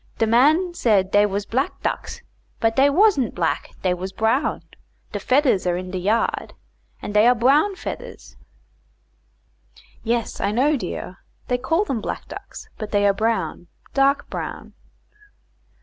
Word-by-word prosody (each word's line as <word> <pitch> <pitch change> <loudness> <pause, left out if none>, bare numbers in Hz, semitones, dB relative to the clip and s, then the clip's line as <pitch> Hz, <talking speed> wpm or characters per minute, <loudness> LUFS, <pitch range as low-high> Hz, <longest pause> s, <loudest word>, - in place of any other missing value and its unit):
De 225 - +2
man 300 +11 +3
said 205 - +2
dey 205 0 +5
was 200 0 -3
black 260 +7 -2
ducks, - - -4 0.4
but 225 0 +1
dey 275 +1 +5
was'nt 285 - +3
black, 165 -2 -1
dey 185 -1 +2
was 185 +2 -5
brown. 220 +8 0 0.5
De - - -3
fedders 255 -9 +2
are 175 0 +1
in 185 0 -6
de 185 - -3
yard, 215 +5 -1 0.5
and 205 - -5
dey 210 +2 +5
are 250 - +5
brown 285 - +3
fedders." - - -8 1.7
"Yes, 235 0 -1
I - - +1
know, 265 +8 +2
dear; 185 -4 -5 0.3
they 250 0 +1
call 330 +10 +1
them 255 - -2
black - - -5
ducks, - - -10
but 215 - -5
they 205 -1 +2
are 200 - +4
brown 195 -5 -2 0.3
dark 275 +1 +2
brown." - - -6
225 Hz, 150 wpm, -22 LUFS, 200-275 Hz, 1.7 s, dey